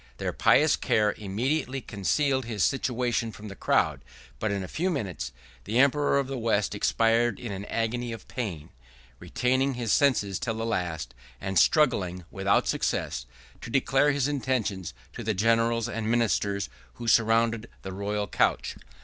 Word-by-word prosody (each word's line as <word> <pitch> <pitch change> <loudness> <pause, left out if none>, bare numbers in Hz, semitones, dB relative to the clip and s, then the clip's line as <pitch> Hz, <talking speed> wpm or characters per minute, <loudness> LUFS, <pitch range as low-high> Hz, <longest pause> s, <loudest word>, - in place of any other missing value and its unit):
Their - - -2
pious - - +4
care 105 -1 +2
immediately 130 +7 -1
concealed 130 +5 0
his 110 -5 -1
situation 125 -3 0
from 105 0 -10
the 100 - -8
crowd; - - +1 0.4
but, - - -1
in 100 -1 -2
a - - -6
few 180 - -1
minutes, 100 - -3 0.3
the 110 +4 -1
emperor 140 +2 +4
of 140 - +1
the 135 -1 -4
West 110 -3 +1
expired 115 +2 +2
in 120 -4 -5
an 100 +1 -5
agony 115 +2 -2
of 115 -2 -8
pain, 90 - -5 0.5
retaining 130 +2 0
his 120 -3 0
senses 115 -9 +2
till 115 -3 -2
the 115 0 -3
last; 90 - -2 0.3
and 95 -2 +1
struggling, 95 - +2
without 95 0 +1
success, - - -1 0.3
to - - -7
declare 135 +3 +3
his 145 -1 +1
intentions 125 - -2 0.2
to - - -7
the 110 -1 -1
generals 115 +2 +2
and 115 -2 -3
ministers, 105 -4 +1 0.3
who 120 - -7
surrounded 115 0 +3
the 95 - -6
royal 105 +1 -2
couch. - - 0
115 Hz, 160 wpm, -27 LUFS, 100-125 Hz, 0.5 s, pious